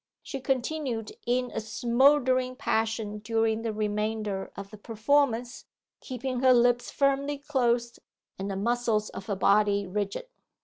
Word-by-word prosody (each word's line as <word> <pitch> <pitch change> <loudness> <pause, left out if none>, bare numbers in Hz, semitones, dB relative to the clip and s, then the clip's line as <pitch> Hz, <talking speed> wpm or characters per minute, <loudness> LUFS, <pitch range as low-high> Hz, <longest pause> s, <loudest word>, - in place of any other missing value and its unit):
She 275 - -5
continued 260 -3 -2
in 250 0 +1
a - - -3
smouldering 255 +3 +2
passion 220 -4 -1
during 225 +1 0
the 225 -1 -2
remainder 210 -1 -2
of 200 0 -8
the 215 - -10
performance, 240 +2 0 0.3
keeping 255 0 -4
her 255 0 +6
lips 245 0 +3
firmly 280 +1 +1
closed, 245 -4 0 0.4
and 195 +1 -3
the 195 - -3
muscles 225 0 0
of 195 - -9
her 205 - -1
body 200 +1 +3
rigid. 200 - -3
235 Hz, 135 wpm, -28 LUFS, 210-255 Hz, 0.4 s, her